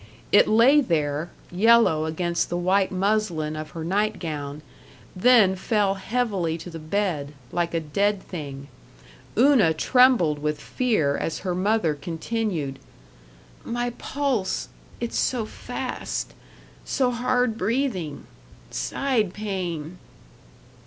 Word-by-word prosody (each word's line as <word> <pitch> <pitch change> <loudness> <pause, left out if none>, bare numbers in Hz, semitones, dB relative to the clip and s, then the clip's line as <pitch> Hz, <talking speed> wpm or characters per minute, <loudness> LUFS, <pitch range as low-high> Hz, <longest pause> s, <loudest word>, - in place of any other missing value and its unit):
It 205 - +6
lay 245 +7 +6
there, 155 - -1 0.2
yellow 190 -5 +4
against 170 +2 -1
the 175 - -1
white 190 +2 +2
muslin 185 -5 0
of 155 0 -6
her 160 - -4
nightgown, 160 -7 -2 0.5
then 200 -1 +5
fell 200 0 +1
heavily 195 -5 -1
to 170 +2 -9
the 165 - -7
bed, 155 -4 -2 0.2
like 170 -1 -1
a - - +2
dead 200 +6 0
thing. 140 -5 -7 0.7
Una 240 - +5
trembled 235 - +4
with 150 0 -2
fear 185 - 0
as 165 - -3
her 180 - 0
mother 185 -3 +1
continued, 160 -1 -3 0.8
"My 240 +1 -2
pulse 260 -6 -2 0.3
it's 235 -1 -2
so 240 -4 0
fast - - -5 0.5
so 255 -2 +1
hard 245 -1 +1
breathing 205 - -2 0.5
side 235 -9 -1
pain." 180 -5 -4
185 Hz, 110 wpm, -24 LUFS, 160-225 Hz, 0.8 s, It